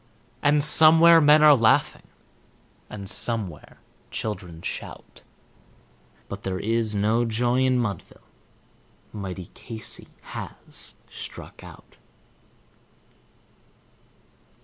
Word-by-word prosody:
And 145 0 +3
somewhere 165 +2 +7
men 150 +1 +5
are 150 -1 +8
laughing, 115 -3 +1 0.8
and 100 -2 -8
somewhere 100 -9 -1 0.3
children 90 -6 -6
shout; - - -8 1.1
But 100 0 -8
there 95 -1 -4
is 110 0 -1
no 110 +4 +1
joy 120 +2 0
in 130 -1 +2
Mudville 110 -5 -5 0.9
mighty 95 -3 -7
Casey 110 -2 -8 0.2
has - - -7
Struck - - -10
Out. - - -15
115 Hz, 85 wpm, -24 LUFS, 100-140 Hz, 1.1 s, are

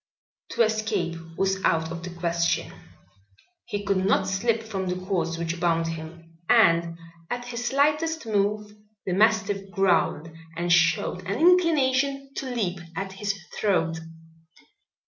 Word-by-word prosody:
To 235 - +4
escape 215 -6 -1 0.2
was 195 0 0
out 160 0 +1
of 170 0 -5
the 180 - -6
question. 170 -1 -1 0.9
He 205 0 -4
could 195 -2 +1
not 195 -1 +2
slip 220 +4 0
from 195 -4 -4
the 180 - -1
cords 180 -3 -2
which 170 +1 -3
bound 165 -1 +1
him, 165 0 -9
and 170 0 +4 0.3
at 245 0 -4
his 240 0 -4
slightest 300 +4 +1
move 210 0 0 0.3
the 185 - -1
mastiff 205 -1 +2
growled 180 -4 +1 0.3
and 175 0 +2
showed 170 +2 +2
an 200 +2 -1
inclination 280 -6 +3
to 265 - -3
leap 195 -8 -2 0.2
at 195 +2 -4
his 200 +1 -3 0.2
throat. 165 -6 0
195 Hz, 135 wpm, -25 LUFS, 170-225 Hz, 0.9 s, To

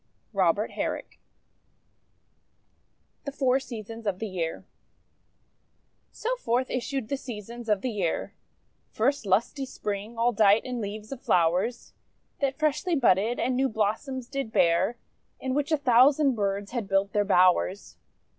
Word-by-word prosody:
ROBERT 195 +2 +2
HERRICK - - -4 2.0
THE 280 - -4
FOUR 265 -2 +2
SEASONS 225 -3 -8
OF 195 -2 0
THE 220 +2 -4
YEAR 170 -3 -4 1.5
So - - -2
forth 250 - -1
issued 255 -1 -2
the 275 - -2
Seasons 235 -1 -8
of 205 -2 +2
the 255 - -2
Year: 190 -6 -2 0.6
First, 270 +1 0
Lusty 225 +9 +1
Spring, 215 -3 -5
all 235 +1 +3
dight 210 -1 +4
in 250 -2 -3
leaves 210 +2 -6
of 270 -2 -6
flowers 180 +8 +1 0.5
That 275 -1 0
freshly 310 +3 +1
budded 230 -3 +2
and 250 +2 0
new 265 +1 +2
blossoms 225 +5 -2
did 275 -4 -4
bear; 170 +7 +2 0.4
In 260 -1 -2
which 290 +2 -1
a 310 - +4
thousand 275 +2 +5
birds 200 -2 -2
had 235 -5 -3
built 195 0 +1
their 205 - +3
bowers. 185 0 +2
230 Hz, 135 wpm, -27 LUFS, 200-265 Hz, 2.0 s, thousand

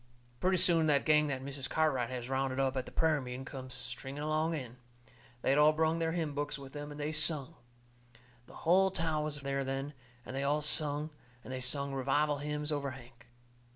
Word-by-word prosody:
Pretty 185 0 +3
soon 165 -3 +5
the 145 -2 +5
gang 150 0 +3
that 130 -2 -3
Mrs. 135 -1 -4
Cartwright 135 -7 +1
has 125 -2 -4
rounded 135 0 -1
up 135 -1 +1
at 130 -1 -2
the - - -9
prayer 160 -3 +2
meeting 125 +1 -6
comes 130 -2 -7
stringing 130 +3 -4
along 155 +2 +1
in. 125 -4 -6 0.7
They - - +1
had 140 - +4
all 150 +1 +7
brung 160 +1 +1
their 165 0 0
hymn 160 -4 -1
books 145 +1 -2
with 135 -1 -11
them, 145 0 -6
and 145 0 -8
they 150 +1 -1
sung. 155 -1 +2 0.9
The - - -14
hull 190 +3 +5
town 160 -4 -1
was 150 -1 -3
there 140 0 -1
then, 135 +2 -3 0.3
and 130 - -6
they 135 - -1
all 145 +2 +1
sung, 150 0 +1 0.3
and 130 - -7
they 130 - -3
sung 140 +2 -1
revival 145 +3 +1
hymns 150 +1 -2
over 145 -2 -1
Hank. 120 -2 -12
145 Hz, 205 wpm, -33 LUFS, 135-155 Hz, 0.9 s, all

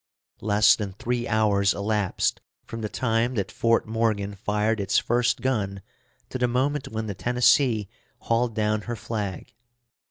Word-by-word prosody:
Less 105 0 +5
than 100 -3 -5
three 120 +4 -2
hours 100 -3 +2
elapsed 105 -1 -1 0.2
from 115 - -7
the 105 - -3
time 120 +1 0
that 100 -4 -2
Fort 115 0 +2
Morgan 110 -3 0
fired 105 +2 -1
its 100 - +1
first 120 0 +1
gun 100 -7 -1 0.5
to 130 - -5
the 125 - +2
moment 135 +3 0
when 110 -4 -4
the 105 - -4
Tennessee 120 0 +2 0.3
hauled 115 0 0
down 105 0 0
her 120 - -1
flag. 105 -5 -5
110 Hz, 150 wpm, -25 LUFS, 105-120 Hz, 0.5 s, Less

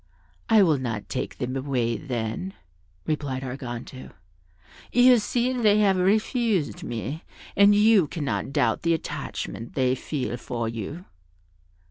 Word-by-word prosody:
"I 220 -2 +6
will 155 -6 +3
not 115 -5 -4
take - - -4
them 125 +1 -3
away, 130 -4 -1
then," 125 - -4 0.5
replied 145 -4 -2
Arganto; 125 -1 -7 0.8
"you 245 0 +6
see 245 +4 0
they 215 -4 +3
have 200 -2 +4
refused 210 - +1
me, 120 +7 -5 0.3
and 200 +1 +6
you 210 -5 +5
cannot 145 -3 -3
doubt 120 -4 +1
the 170 0 +2
attachment 120 -6 -6
they 130 -2 +2
feel 130 -2 -3
for 115 -1 -4
you." 115 - -6
145 Hz, 125 wpm, -25 LUFS, 125-205 Hz, 0.8 s, I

